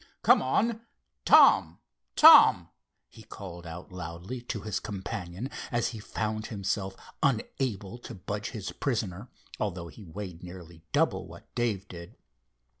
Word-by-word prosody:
Come - - +6
on. 225 - 0 0.4
Tom! - - +6 0.4
Tom!" - - +8 0.4
he - - -15
called 85 -3 -10
out 85 +3 -9
loudly, 90 +7 -7
to 115 -3 -5
his 105 0 -3
companion, 100 0 -5 0.2
as 120 -2 +1
he 115 - -8
found 110 0 -3
himself 100 -2 -3 0.3
unable 120 -4 -1
to - - -9
budge 100 +3 -5
his 105 -6 -6
prisoner, 110 -4 -3 0.3
although 90 -5 -3
he 110 - -13
weighed 90 -1 -8
nearly 85 -2 -11
double - - +1
what - - -14
Dave 110 -5 -1
did. 85 -2 -10
100 Hz, 130 wpm, -28 LUFS, 90-115 Hz, 0.4 s, Tom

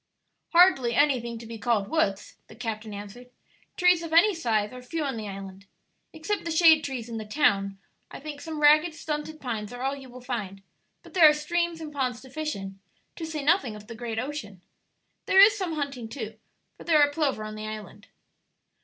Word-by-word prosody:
"Hardly 305 -10 +5
anything 245 -5 +2
to 230 - -10
be 225 0 -8
called 210 -3 +1
woods," 210 -12 -1
the - - -14
captain 220 -2 -5
answered; 205 +5 -9 0.5
"trees 360 -1 +4
of 330 -1 -6
any 360 +6 +6
size 225 - -1
are 250 - -9
few 310 +6 -4
on 275 -3 -2
the 215 -2 -5
island. 195 0 -9 0.4
Except 325 +6 -3
the 335 - -4
shade 320 -1 +6
trees 255 -4 -4
in 230 -1 -5
the - - -5
town, 200 -5 +1 0.3
I - - -9
think 290 0 -8
some 315 -2 -6
ragged, 305 +2 +5
stunted 310 -1 -5
pines 220 -5 -4
are 245 +1 -7
all 270 +1 0
you 270 -2 -11
will 250 +1 -11
find; 210 -6 -5 0.4
but - - -15
there 335 -5 +8
are - - +4
streams 340 +2 -1
and 310 -2 -8
ponds 255 -4 -1
to 260 - -14
fish 310 +1 -3
in, 195 0 -8 0.4
to 325 - -6
say 310 -2 -4
nothing 280 - +2
of 210 0 -11
the 230 - -9
great 230 -1 -5
ocean. 225 -8 -5 0.6
There 385 - +5
is 410 +2 +8
some 375 -5 -3
hunting, 280 -6 -4
too, 225 -4 -7 0.4
for - - -11
there 320 -3 +4
are 290 - +3
plover 290 -8 -1
on 215 0 -6
the 215 0 -6
island." 215 0 -9
260 Hz, 205 wpm, -27 LUFS, 215-310 Hz, 0.6 s, there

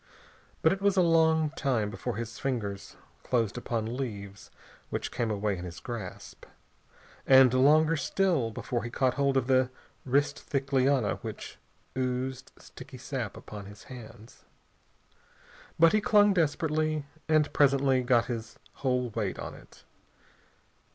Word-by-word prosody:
But - - +5
it 195 - -6
was 200 -1 +2
a 185 - +6
long 160 -2 +3
time 120 -9 -1
before 120 +2 -4
his 115 +1 -6
fingers 105 -7 -4 0.3
closed 115 -5 0
upon 115 -1 -3
leaves 100 -6 -6 0.4
which - - -3
came 120 -2 -1
away 105 -1 -1
in 90 - -7
his 90 -1 -8
grasp, 115 -7 -8 0.8
and 130 -2 +7
longer 155 +5 +5
still 160 -3 +1
before 120 +2 -3
he 120 - -4
caught 130 +1 +1
hold 140 0 +1
of 130 -2 0
a 130 0 +4 0.3
wrist 140 +2 +1
thick 140 0 -4
liana 130 -4 +2
which - - -8 0.4
oozed 130 0 -3
sticky 130 0 -12
sap 125 -5 -5
upon 105 -2 -9
his 105 0 -13
hands. 115 -3 -12 1.3
But 165 0 +6
he 215 - +3
clung 205 -4 +5
desperately, 155 -2 0 0.2
and 155 -2 +3
presently 135 -2 +3
got 120 -2 +3
his 115 -2 -6 0.2
whole 125 -3 -1
weight 105 -3 -2
on - - -6
it. - - -16
130 Hz, 140 wpm, -29 LUFS, 115-145 Hz, 1.3 s, and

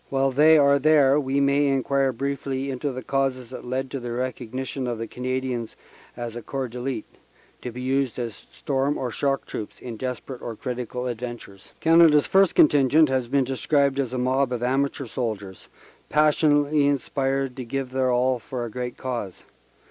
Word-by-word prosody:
While 135 0 +1
they 155 +4 +6
are 140 -1 +5
there 145 -1 +5
we 135 0 0
may 140 +1 +3
enquire 135 0 +1
briefly 135 +1 -3
into 135 +2 -3
the 130 0 -6
causes 130 -3 -1
that 130 - -8
led 130 +1 -3
to 135 - -3
the 120 -1 -5
recognition 130 +1 -4
of 120 -1 -2
the 115 - -4
Canadians 125 -1 -3 0.4
as 120 -1 -5
a 120 - -5
corps 135 +2 -4
d 125 +2 -7
elile, 125 -3 -3 0.6
to 125 - -5
be 125 +2 -7
used 135 -1 0
as 115 -4 -6
storm 140 0 -1
or 125 -2 -3
shock 135 +3 -1
troops 105 - -7
in 120 -3 -7
desperate 130 +1 -5
or 115 - -5
critical 125 0 -4
adventures. 120 -5 -7
Canada 165 -2 +6
s 145 - +2
first 195 -2 +3
contingent 145 +1 +5
has 130 -2 0
been 135 +2 +2
described 140 +1 +1
as 130 -4 -1
a 130 - -3
mob 130 +1 +1
of 120 -1 -2
amateur 135 +2 0
soldiers 105 -6 -5 0.4
passionately 150 -1 +3
inspired 135 -1 -1
to 130 - -4
give 130 +1 -4
their 130 0 +1
all 125 0 +2
for 120 +1 -5
a 115 - -7
great 125 +1 -5
cause. 120 -8 -5
130 Hz, 180 wpm, -24 LUFS, 125-140 Hz, 0.6 s, they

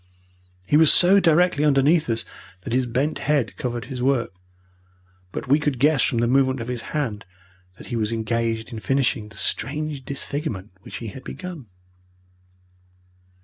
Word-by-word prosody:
He 145 - +3
was 160 -1 +8
so 190 +3 +7
directly 170 -3 +3
underneath 150 +1 +3
us 115 0 -1 0.4
that 110 - -5
his 130 0 +1
bent 130 +6 -1
head 140 -8 0
covered 120 -2 -4
his 130 -3 -6
work, 130 -5 0 1.0
but - - -6
we 140 +4 +4
could 145 -3 -1
guess 145 +2 +3
from 120 - +1
the 120 +1 +2
movement 130 +1 +2
of 115 +1 -5
his 125 -2 -2 0.2
hand 115 -9 -2 0.5
that - - -12
he - - 0
was 110 -1 -1
engaged 115 +1 -2
in 110 - -5
finishing 125 -4 0
the 110 - -15
strange 150 0 -2
disfigurement 135 - -4
which - - -10
he 115 - -6
had 130 +6 -10
begun. 180 -9 -8
130 Hz, 160 wpm, -23 LUFS, 115-150 Hz, 1.0 s, was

